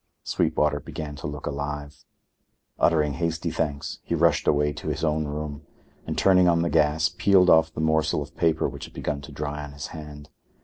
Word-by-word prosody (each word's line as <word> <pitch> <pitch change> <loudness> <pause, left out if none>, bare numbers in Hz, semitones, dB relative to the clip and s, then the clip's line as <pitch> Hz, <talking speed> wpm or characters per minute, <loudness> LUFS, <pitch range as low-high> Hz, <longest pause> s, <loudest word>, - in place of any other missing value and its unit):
Sweetwater 75 -1 +1
began 75 +1 -7
to 70 - -5
look 75 -1 -6
alive. 75 0 -5 0.7
Uttering 75 -3 +3
hasty 85 +1 -2
thanks, 75 -3 -3
he 85 - -2
rushed 85 -2 +2
away 75 0 +2
to - - -8
his - - -2
own 75 -1 +1
room 75 0 -5 0.5
and, - - -3
turning 90 -2 +5
on 85 -1 +3
the 85 - -1
gas, 80 +1 +3
peeled 90 +1 +4
off 80 0 +5
the 80 - -4
morsel 80 0 +2
of - - -15
paper 80 -1 +2
which - - -7
had - - -15
begun 70 -1 -3
to 70 - -11
dry 75 0 -4
on 75 -1 -9
his 70 0 -7
hand. 75 -2 -9
75 Hz, 190 wpm, -25 LUFS, 75-80 Hz, 0.7 s, turning